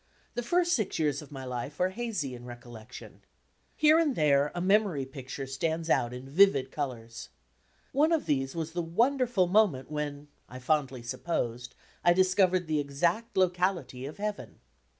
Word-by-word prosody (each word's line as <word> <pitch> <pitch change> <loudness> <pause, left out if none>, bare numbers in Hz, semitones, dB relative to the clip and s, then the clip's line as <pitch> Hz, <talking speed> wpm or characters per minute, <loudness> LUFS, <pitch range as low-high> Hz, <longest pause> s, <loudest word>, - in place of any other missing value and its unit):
The 240 - -2
first 345 +7 +2
six 215 -5 0
years 150 -3 0
of 150 - -13
my 135 -2 -7
life 125 +4 -5
are 180 +1 +2
hazy 200 - -3
in 120 -1 -9
recollection. 120 -1 -11 0.5
Here 310 +1 +5
and 300 -6 +1
there, 145 -1 +3
a - - -2
memory 190 -6 +2
picture 135 0 -7
stands 160 +5 -2
out 120 - +2
in 125 +1 -8
vivid 140 -4 +4
colours. 115 -6 -5 0.6
One 300 +4 +3
of 325 -2 +1
these 135 -1 -1
was 165 -1 -3
the 175 +1 -2
wonderful 235 +4 +2
moment 175 -9 +2
when, 150 -1 -4 0.2
I 130 - -9
fondly 130 -2 -1
sup 125 +2 -7
posed, 120 -7 -2 0.3
I 175 - +6
discovered 185 0 +3
the 155 -1 0
exact 170 +12 -1
locality 175 -8 0
of 150 - -9
Heaven. 210 0 -5
155 Hz, 165 wpm, -29 LUFS, 130-190 Hz, 0.6 s, I